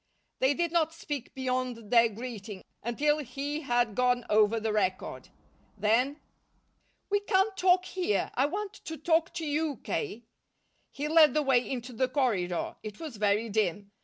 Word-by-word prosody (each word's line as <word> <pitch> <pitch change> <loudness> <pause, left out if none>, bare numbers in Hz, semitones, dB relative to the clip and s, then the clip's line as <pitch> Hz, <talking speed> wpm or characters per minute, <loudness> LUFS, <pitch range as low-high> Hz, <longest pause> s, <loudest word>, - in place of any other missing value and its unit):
They 265 +2 +3
did 340 -1 0
not 325 -1 +1
speak 290 -6 -5
beyond 255 -4 -2
their 235 -1 +6
greeting, 215 -3 -7 0.2
until 295 +6 +1
he 285 +3 -4
had 245 -5 +1
gone 250 +1 +1
over 215 +1 +4
the 220 -1 -1
record. 190 -3 -2 0.5
Then: 240 +8 +2 0.9
"We 410 - +3
can't 390 0 +1
talk 365 -1 +3
here. 355 - -1
I 265 +3 +2
want 405 +5 -4
to 320 - -5
talk 325 +1 +2
to 325 - -3
you, 300 0 0
K." 230 +3 -3 0.7
He 290 +1 -4
led 310 -3 +6
the 305 - +3
way 255 -3 +2
into 250 -1 -4
the 255 +3 +1
corridor. 205 - 0
It 210 -2 -8
was 305 -9 -7
very 210 +2 +2
dim. 205 -2 -1
255 Hz, 160 wpm, -29 LUFS, 220-305 Hz, 0.9 s, their